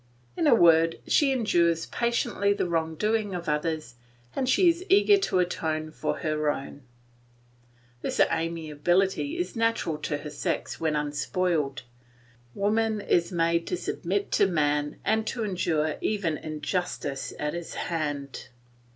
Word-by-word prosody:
In 325 - +1
a 255 - +7
word, 165 -3 +5
she 285 -2 +3
endures 170 -10 +2
patiently 235 -4 0
the 200 - -1
wrong 160 -1 -1
doing 210 +1 0
of 175 -1 -5
others, 150 -3 -1 0.4
and 260 -1 0
she 360 +7 +4
is 340 +1 +2
eager 405 +1 +6
to 390 - 0
atone 155 -3 -1
for - - -2
her 155 -1 0
own. 140 0 -4 1.2
This - - -3
amiability 170 - +1
is 355 -5 -3
natural 230 -9 0
to 150 -1 -2
her 145 +1 -8
sex 145 - -3
when 160 -2 0
unspoiled. 150 0 -1 0.7
Woman 215 +2 +1
is 175 -3 +1
made 170 -1 +1
to 180 - -1
submit 190 +3 -2
to 200 - +4
man 150 -4 0
and 220 0 +1
to 235 - -2
endure 165 -6 0
even 200 -7 0
injustice 155 -2 -3
at 150 0 -2
his 170 -1 -6
hands. 145 -5 -3
170 Hz, 140 wpm, -27 LUFS, 155-210 Hz, 1.2 s, a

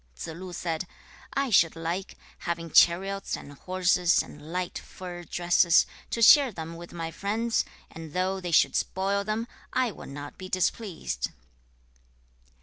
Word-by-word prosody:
2. 160 - -6
Tsze - - -10
lu 185 -1 -7
said, 170 0 -3 0.5
'I 275 -2 0
should 165 -5 +5
like, 170 +4 -4 0.2
having 170 -1 -4
chariots 195 +5 +4
and 145 - -11
horses, 180 +2 +2
and 150 +2 -12
light 180 0 -2
fur 175 -1 -9
dresses, 175 0 +4 0.2
to 230 - 0
share 275 +2 +8
them 165 -3 -7
with 170 +1 -10
my 165 -1 -5
friends, 225 +6 0 0.3
and 160 -2 -9
though 185 +1 0
they 180 -1 -5
should 165 - +4
spoil 195 +2 0
them, 215 +2 -2 0.3
I 255 -3 +2
would - - -10
not 145 +1 -8
be 185 0 -7
displeased.' 185 - -1
180 Hz, 150 wpm, -27 LUFS, 165-195 Hz, 0.5 s, share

